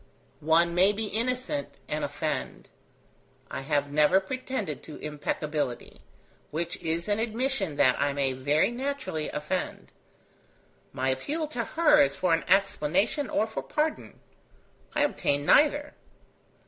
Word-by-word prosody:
One 165 +2 +3
may 190 +4 +4
be 220 +2 -3
innocent 255 +6 -2
and - - -2
offend. - - -3 0.8
I - - -4
have 145 0 0
never 150 +6 +5
pretended 210 - -4
to 155 - -10
impeccability, 150 -3 -3 0.5
which 165 +3 -3
is 165 0 -2
an 205 0 +1
admission 225 - -1
that 130 -1 +3
I 140 0 +2
may 140 -1 0
very 145 - +2
naturally 260 - -3
offend. 150 +5 -4 1.0
My 130 +1 -1
appeal 290 - -1
to 245 -6 -2
her 300 +1 +4
is 285 - +2
for 180 -3 +1
an 165 - +1
explanation 195 - +2
or 215 - +1
for 220 - -5
pardon. 305 +1 -2 0.8
I 295 - +3
obtain 145 - 0
neither. 290 - +4
185 Hz, 130 wpm, -28 LUFS, -, 1.0 s, never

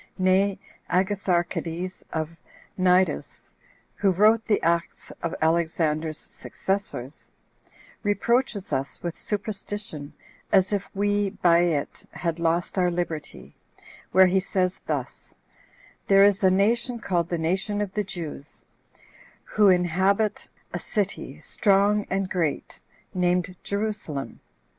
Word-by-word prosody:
Nay, 190 +1 +3 0.3
Agatharchides 180 -2 -1
of 160 +1 -3 0.4
Cnidus, 185 0 +1 0.4
who 200 - +1
wrote 215 +5 +4
the 210 - +2
acts 170 +1 -1
of 170 - -2
Alexander's 160 -1 +1
successors, 155 -9 -5 0.7
reproaches 210 0 0
us 135 +1 -3
with 170 -1 -3
superstition, 205 -7 -5 0.4
as 190 0 +4
if 200 -1 -2
we, 205 0 +1
by 170 -2 +3
it, 165 -5 -1
had 170 -1 -2
lost 170 +3 0
our 180 -1 +3
liberty; 170 -3 -4 0.6
where 190 0 +7
he 185 +1 +3
says 185 -1 -1
thus: - - -4 0.7
"There 195 0 +7
is 200 0 +4
a 190 - +7
nation 230 +6 +2
called 175 -6 -1
the 170 - -1
nation 195 +6 -1
of 205 -2 -2
the 210 - 0
Jews, 170 -7 -8 0.8
who 210 -2 +3
inhabit 190 +4 +2 0.2
a - - -2
city 200 -3 -3
strong 205 +1 +2
and 195 0 0
great, 170 -6 -2 0.3
named 180 0 +1
Jerusalem. 200 -9 -3
185 Hz, 115 wpm, -25 LUFS, 170-200 Hz, 0.8 s, where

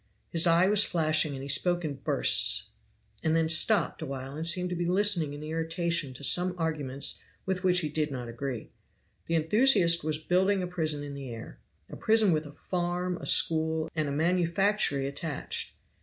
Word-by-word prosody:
His 170 +1 +2
eye 170 +2 +4
was 210 0 +3
flashing, 155 -4 +1
and 135 - -7
he - - -7
spoke 175 +4 0
in 150 - -3
bursts, - - +4 0.5
and 160 0 0
then 165 -1 +1
stopped 170 +5 +1
a - - -4
while 135 0 -7
and 160 +2 -4
seemed 180 +1 +1
to - - -2
be 175 0 -2
listening 180 -5 +2
in 145 - -9
irritation 165 -1 -2
to 140 - -11
some 180 +6 +2
arguments 150 -5 -3 0.3
with 190 -1 -3
which 180 -1 +3
he 155 - -3
did 150 0 -2
not 125 -3 -6
agree. 120 0 -6 0.6
The 165 - -1
enthusiast 170 - +3
was 155 0 -2
building 185 +4 +1
a - - -3
prison 155 -4 -3
in 145 -1 -7
the 140 -2 -8
air. 115 - -10 0.3
A - - -10
prison 220 -3 +3
with 155 -1 -1
a - - -11
farm, 180 +2 -3
a - - -7
school, 160 0 +2
and 155 -2 -1
a - - -4
manufactory 170 0 0
attached. 145 +2 -4
165 Hz, 185 wpm, -28 LUFS, 145-180 Hz, 0.6 s, eye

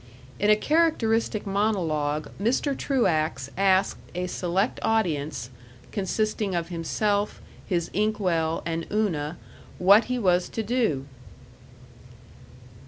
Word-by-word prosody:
In 205 - +2
a 210 - +7
characteristic 230 -7 +1
monologue 165 -8 0
Mr. 260 +6 +1
Truax 160 - 0
asked 195 0 +2 0.2
a 180 0 -1
select 180 +4 -1
audience, 155 - -1 0.4
consisting 210 0 -1
of 170 0 -2
himself, 200 +5 -1 0.3
his 170 -3 -1
inkwell, 180 -6 0
and 165 0 -3
Una, 175 -7 -1 0.4
what 200 +5 +6
he 250 0 -2
was 180 -5 +2
to 225 - -3
do. 215 - 0
195 Hz, 105 wpm, -26 LUFS, 165-215 Hz, 0.4 s, a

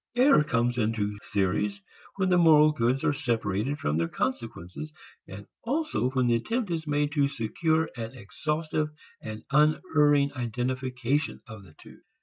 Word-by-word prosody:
Error 255 - +5
comes 120 -2 0
into 105 -2 -1
theories 100 0 0 0.3
when 190 -1 0
the 180 - +4
moral 155 -2 +6
goods 130 -2 0
are - - +2
separated 120 -2 -1
from 75 - -1
their 85 0 +1
consequences 115 - -4 0.4
and 100 +1 -9 0.2
also 290 - -1
when 130 -1 +1
the 120 - +3
attempt 215 - -1
is 160 -2 -3
made 145 0 0
to 145 -2 +2
secure 160 +6 0
an 115 -2 -5
exhaustive 150 +7 -2 0.3
and 110 0 -7
unerring 150 -1 +3
identification 130 +2 -2
of 110 -4 -11
the 80 -5 -18
two. - - -16
130 Hz, 145 wpm, -27 LUFS, 110-155 Hz, 0.4 s, moral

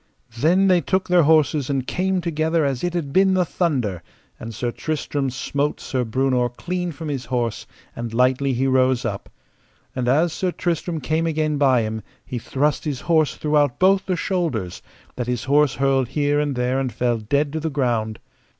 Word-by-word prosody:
Then 180 +8 +4
they 180 -2 +4
took 190 +2 0
their 180 -1 +5
horses 155 -3 +3
and 135 -2 -1
came 185 +3 0
together 160 -1 0
as 135 -3 -2
it 175 0 -1
had 145 -5 -3
been 190 0 +4
the 180 -1 +2
thunder; 130 - -1 0.4
and 115 - -7
Sir 120 +2 -3
Tristram 145 -1 -2
smote 140 +3 -2
Sir 130 -2 -2
Breunor 125 +1 +1
clean 180 +7 -4
from 155 +1 -7
his 135 -4 -3
horse, 120 -2 -2 0.3
and 120 -1 -5
lightly 130 +3 +2
he 130 +2 0
rose 130 -2 +2
up; 100 -3 -4 0.7
and 125 -1 -2
as 155 +6 +3
Sir 185 +1 -1
Tristram 170 -2 -2
came 160 +3 0
again 155 -2 0
by 130 -5 +4
him 110 0 -4 0.2
he 125 - -4
thrust 145 +5 0
his 145 -5 -3
horse 160 -3 +2
throughout 150 -4 +1
both 190 +1 +3
the 185 - +1
shoulders, 160 - -2 0.4
that 125 -1 -3
his 125 -2 -2
horse 145 0 +3
hurled 135 -2 +1
here 145 +2 +1
and 145 -2 -1
there 125 +2 0
and 130 -2 -2
fell 120 -1 0
dead 140 +7 0
to 160 - -1
the 160 +1 -2
ground. 120 -6 -1
140 Hz, 185 wpm, -22 LUFS, 125-160 Hz, 0.7 s, their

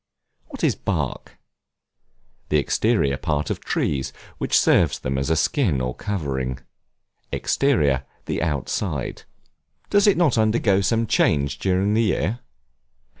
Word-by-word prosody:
What - - -9
is - - +4
Bark? - - -4 1.1
The 75 - +3
exterior 70 -1 +1
part 75 0 -2
of - - -3
trees, 65 -2 -1 0.3
which - - +2
serves - - +3
them 65 +2 -3
as 70 - -2
a 80 - +3
skin 85 - +1
or 65 0 -2
covering. 70 - -3 0.7
Exterior, 70 - +1 0.2
the - - -2
outside. 75 - -2 0.7
Does 205 0 +4
it 205 - +4
not 155 -10 +3
undergo 110 -3 +2
some 115 +3 +1
change 70 -9 +1
during 95 +2 +1
the 110 - +3
year? 105 +1 0
80 Hz, 125 wpm, -23 LUFS, 70-110 Hz, 1.1 s, is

